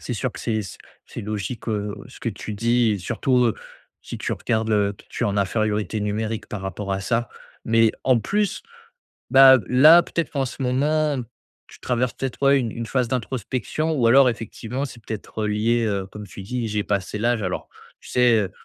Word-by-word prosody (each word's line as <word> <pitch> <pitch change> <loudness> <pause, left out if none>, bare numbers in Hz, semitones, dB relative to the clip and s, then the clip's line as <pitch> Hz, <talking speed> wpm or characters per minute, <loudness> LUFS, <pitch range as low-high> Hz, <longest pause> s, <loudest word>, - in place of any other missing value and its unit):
C'est 125 - -4
sûr 125 +2 -2
que - - -11
c'est 110 -2 -1 0.5
c'est - - -7
logique, 105 +3 -5
heu, 105 -2 -2
ce 125 - -15
que - - -2
tu 105 0 -6
dis, 115 +2 +2
et 100 - -2
surtout, 125 +7 +1
heu, 115 - +1 0.5
si - - -7
tu - - -4
regardes 110 -1 -1
le 100 -2 +1 0.2
tu - - -2
es - - +2
en 105 0 -1
infériorité 105 0 0
numérique 105 +1 -2
par 105 - -6
rapport 95 +1 -4
à 95 - -1
ça. 115 +4 -1 0.4
Mais 115 0 +4
en 125 -3 +4
plus, 205 - -1 0.7
bah, 135 -1 +8
là 155 +7 +8
peut-être 170 -1 -3
qu'en 135 -2 0
ce 130 - -6
moment, 145 +2 +1 0.5
tu - - -16
traverses 125 -1 -1
peut-être 135 -1 -5
ouais 140 0 +5
une 115 -4 -2
une 115 -1 -5
phase 125 -1 0
d'introspection 130 +5 -2
ou 130 -7 +2
alors 135 +3 +7
effectivement 120 +3 -3
c'est 125 -3 -10
peut-être, 110 0 -5
heu, - - 0
lié, 115 +3 +1
heu, 100 -2 -2
comme 105 +2 -9
tu 100 - -10
dis: 120 +4 -3
«J'ai 105 -1 -1
passé 100 +1 -2
l'âge.» 115 -2 +1
alors 90 - -4 0.3
tu - - -14
sais? 125 -1 +4
Heu, 95 -3 -2
115 Hz, 200 wpm, -23 LUFS, 105-130 Hz, 0.7 s, bah